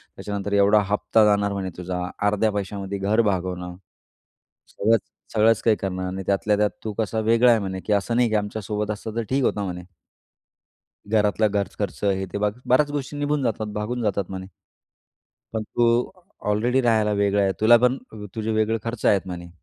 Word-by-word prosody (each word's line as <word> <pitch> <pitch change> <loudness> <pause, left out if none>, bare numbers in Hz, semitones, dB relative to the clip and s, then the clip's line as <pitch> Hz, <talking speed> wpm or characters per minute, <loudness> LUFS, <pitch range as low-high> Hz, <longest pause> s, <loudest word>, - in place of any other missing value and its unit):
त्याच्यानंतर 100 0 -4
एवढा 100 +1 +5
हप्ता 105 +1 +3
जाणार 100 -1 +2
म्हणे 95 -1 -3
तुझा. 90 0 -4 0.3
अर्ध्या 105 +1 +2
पैशामध्ये 100 -1 -4
घर 100 +4 +2
भागवणं 90 -1 -4 0.9
सगळचं, 110 +1 +1 0.3
सगळंच 110 -1 +4
काही 110 -2 +4
करणार 95 -1 -3
नाही 95 0 -5
त्यातल्या 100 +1 +2
त्यात 105 0 +3
तू 110 - -4
कसा 110 0 -1
वेगळा 115 +3 +4
आहे 115 - +4
म्हणे, 95 -2 -4
की 105 - +1
असं 105 +3 0
नाही 120 -1 +3
की 110 - 0
आमच्या 105 +1 -2
सोबत 105 +1 -2
असतं 110 +1 -6
तर 115 - 0
ठीक 135 +1 +1
होतं 105 -4 0
म्हणे. 90 -1 -5 1.3
घरातला 105 0 +2
घर 100 -1 -1
खर्च 100 -2 -4
आहे. 95 -1 +1
ते 95 +2 -6
ब 105 0 +1 0.2
बऱ्याच 145 +4 +3
गोष्टी 145 0 -4
निघून 145 0 0
जातात, 110 -2 -1
भागून 110 +4 -3
जातात 100 -4 -1
म्हणे. 95 -1 -6 1.1
पण 110 -1 -2
तू 120 +3 0 0.6
ऑलरेडी 120 +5 +2
राहायला 110 -3 +2
वेगळा 100 0 +2
आहे. 95 - +2
तुला 115 +2 +7
पण 125 +2 +2 0.4
तुझे 110 0 -2
वेगळे 110 +1 +1
खर्च 115 -1 -4
आहेत 100 - +4
म्हणे. 85 -2 -7
105 Hz, 180 wpm, -23 LUFS, 100-115 Hz, 1.3 s, तुला